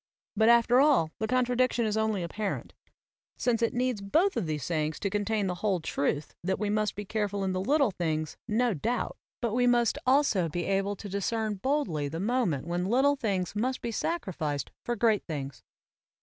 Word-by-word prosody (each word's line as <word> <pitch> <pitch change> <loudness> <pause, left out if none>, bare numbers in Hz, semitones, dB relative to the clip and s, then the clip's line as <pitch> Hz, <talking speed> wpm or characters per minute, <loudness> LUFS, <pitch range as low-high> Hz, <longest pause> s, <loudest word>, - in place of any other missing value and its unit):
But 220 +2 +4
after 235 +1 +5
all 275 - +4
the 220 - -1
contradiction 250 0 +2
is 215 -1 0
only 220 -4 0
apparent, 200 +4 -4 0.6
since 235 -2 +1
it 230 - +2
needs 250 -4 0
both 325 - +2
of 190 - -1
these 150 -3 -2
sayings 155 -2 -1
to 200 - -2
contain 205 0 0
the 185 - -1
whole 200 -4 +1
truth 145 -1 -2
that 190 +2 0
we 205 0 -1
must 215 -1 0
be 205 - -5
careful 205 -1 -2
in 190 -1 0
little 255 +7 +2
things, 155 -4 -2
no 235 +1 +2
doubt, 230 - -2 0.3
but 230 -3 0
we 245 +1 +3
must 240 -2 +3
also 255 - +3
be 175 +3 -2
able 195 +1 0
to 205 - -8
discern 210 +3 -1
boldly 195 - -1
the 160 +3 -5
moment 205 - 0
when 175 +2 -2
little 270 +5 +4
things 200 -8 -2
must 255 +5 -1
be 235 - -4
sacrificed 180 - -2
for 240 - -1
great 220 -3 +2
things. 140 -5 -5
210 Hz, 185 wpm, -29 LUFS, 180-240 Hz, 0.6 s, after